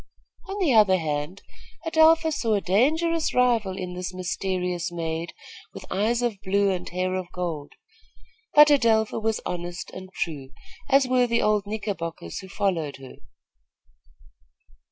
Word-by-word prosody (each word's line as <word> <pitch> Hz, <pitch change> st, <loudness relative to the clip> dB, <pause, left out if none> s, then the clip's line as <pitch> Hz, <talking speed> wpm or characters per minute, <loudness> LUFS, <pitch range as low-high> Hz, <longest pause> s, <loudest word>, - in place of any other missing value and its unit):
On 395 Hz, -, -4 dB
the 345 Hz, -10 st, +2 dB
other 205 Hz, -4 st, +5 dB
hand, 150 Hz, +2 st, -4 dB, 0.4 s
Adelpha 320 Hz, 0 st, +4 dB
saw 230 Hz, -7 st, 0 dB
a -, -, +2 dB
dangerous 310 Hz, -, +1 dB
rival 230 Hz, -7 st, +2 dB
in 180 Hz, -2 st, -5 dB
this 180 Hz, 0 st, -5 dB
mysterious 180 Hz, -1 st, -2 dB
maid 165 Hz, -1 st, -4 dB, 0.4 s
with -, -, -8 dB
eyes 225 Hz, +5 st, +1 dB
of 220 Hz, -5 st, -2 dB
blue 200 Hz, 0 st, +1 dB
and 180 Hz, -1 st, -4 dB
hair 185 Hz, +1 st, -2 dB
of 185 Hz, -1 st, -4 dB
gold; 165 Hz, -5 st, -5 dB, 0.8 s
but 295 Hz, 0 st, +8 dB
Adelpha 225 Hz, -6 st, +3 dB
was 220 Hz, 0 st, -1 dB
honest 175 Hz, 0 st, -5 dB
and 185 Hz, 0 st, -10 dB
true, 145 Hz, -8 st, -5 dB, 0.4 s
as 275 Hz, -1 st, +4 dB
were 250 Hz, -1 st, +3 dB
the 235 Hz, 0 st, +1 dB
old 210 Hz, -1 st, +1 dB
Knickerbockers 190 Hz, -, -5 dB
who 190 Hz, -, -11 dB
followed 170 Hz, -7 st, -1 dB
her. 135 Hz, -1 st, -12 dB
195 Hz, 140 wpm, -25 LUFS, 175-235 Hz, 0.8 s, but